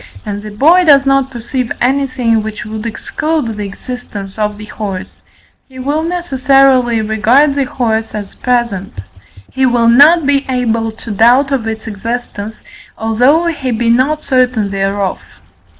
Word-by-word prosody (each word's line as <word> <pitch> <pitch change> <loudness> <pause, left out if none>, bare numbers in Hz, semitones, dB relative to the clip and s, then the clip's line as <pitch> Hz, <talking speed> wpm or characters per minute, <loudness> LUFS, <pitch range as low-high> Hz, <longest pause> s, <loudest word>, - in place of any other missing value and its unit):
and 205 -1 -4
the 215 - -8
boy 310 - +4
does 280 -4 +5
not 275 -1 +2
perceive 245 0 -4
anything 255 -3 +1
which 215 0 -6
would 215 +1 -5
exclude 270 +2 -3
the 210 - -4
existence 205 -1 -8
of 210 -1 -1
the 215 - -9
horse, 205 -3 -7 0.5
he 260 - -14
will 285 +4 -1
necessarily 270 -8 +2
regard 230 +7 +3
the 280 -1 0
horse 225 -3 -2
as 205 -2 -6
present: 235 - -2 0.5
he 265 - -1
will 240 -1 +2
not 290 +7 +6
be 280 0 +2
able 230 -3 0
to 220 +1 -9
doubt 245 +7 +3
of 250 -5 -1
its 220 -1 -5
existence, 220 0 -5 0.3
although 245 +9 +2
he 300 -6 -2
be 230 0 +1
not 280 +6 +1
certain 255 -6 +1
thereof. 195 0 -1
240 Hz, 150 wpm, -14 LUFS, 215-275 Hz, 0.5 s, not